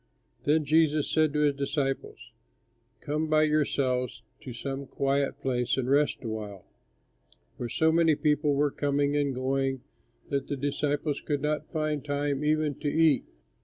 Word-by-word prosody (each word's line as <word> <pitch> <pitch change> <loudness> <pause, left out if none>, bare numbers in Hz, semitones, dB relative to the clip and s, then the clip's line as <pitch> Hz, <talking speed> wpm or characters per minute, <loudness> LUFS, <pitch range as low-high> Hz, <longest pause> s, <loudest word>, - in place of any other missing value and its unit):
Then 150 +1 +3
Jesus 155 0 +3
said 155 -1 +3
to 150 - +1
his 145 -1 +3
disciples, 140 0 -3 0.7
"Come 155 +2 -1
by 155 0 +4
yourselves 130 -6 0 0.2
to 130 - -8
some 135 +3 -5
quiet 140 +1 0
place 125 -1 0
and 130 -2 -1
rest 145 +1 +2
a - - -4
while"; 105 -4 -6 0.9
for 120 - -5
so 160 +7 +2
many 165 -1 +4
people 150 -1 +1
were 145 0 +2
coming 145 0 0
and 140 -2 0
going 135 0 -1 0.5
that 140 -1 -1
the 145 - -3
disciples 145 +1 -1
could 145 -2 -2
not 150 0 -2
find 155 -3 -1
time 145 -1 -1
even 155 0 +1
to 145 - -1
eat. 160 -3 +3
145 Hz, 155 wpm, -28 LUFS, 135-150 Hz, 0.9 s, by